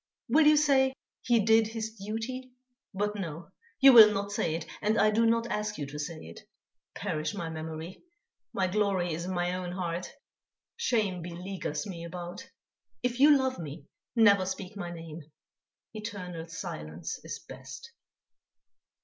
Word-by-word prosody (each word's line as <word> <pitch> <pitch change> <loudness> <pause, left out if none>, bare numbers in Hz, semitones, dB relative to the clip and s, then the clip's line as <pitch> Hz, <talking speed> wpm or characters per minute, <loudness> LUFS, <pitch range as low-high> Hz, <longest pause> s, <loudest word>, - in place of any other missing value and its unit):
Will 310 0 +5
you 305 0 +7
say: 265 -3 +4 0.3
'He 240 -1 +3
did 225 0 +5
his 220 0 -4
duty'? 225 +5 -5 0.4
But 205 +2 -1
no! 170 -4 -6 0.3
You 270 -1 +9
will 220 -3 +10
not 200 0 -2
say 160 -5 0
it 165 -1 -4 0.2
and 215 +1 +2
I 215 - +5
do 230 +2 +3
not 230 0 +2
ask 210 0 -2
you 145 - -3
to 145 +2 -8
say 155 +2 -5
it. 85 +1 -10 0.6
Perish 155 0 -2
my 165 -1 -4
memory! 160 +2 -6 0.5
My 190 - 0
glory 185 -3 +1
is 170 +2 -4
in 185 - -3
my 175 0 0
own 180 -1 -4
heart; 180 -1 -3 0.6
shame 215 - 0
beleaguers 175 0 -4
me 175 -5 -6
about. 175 +8 -7 0.5
If 245 0 -1
you 290 +1 +8
love 260 -4 -1
me, 150 -2 -7 0.3
never 200 -5 +5
speak 190 +1 -5
my 175 -4 -5
name; 165 -1 -8 0.7
eternal 190 -6 -6
silence 80 - -6
is - - -5
best." - - -11
190 Hz, 155 wpm, -29 LUFS, 170-225 Hz, 0.7 s, will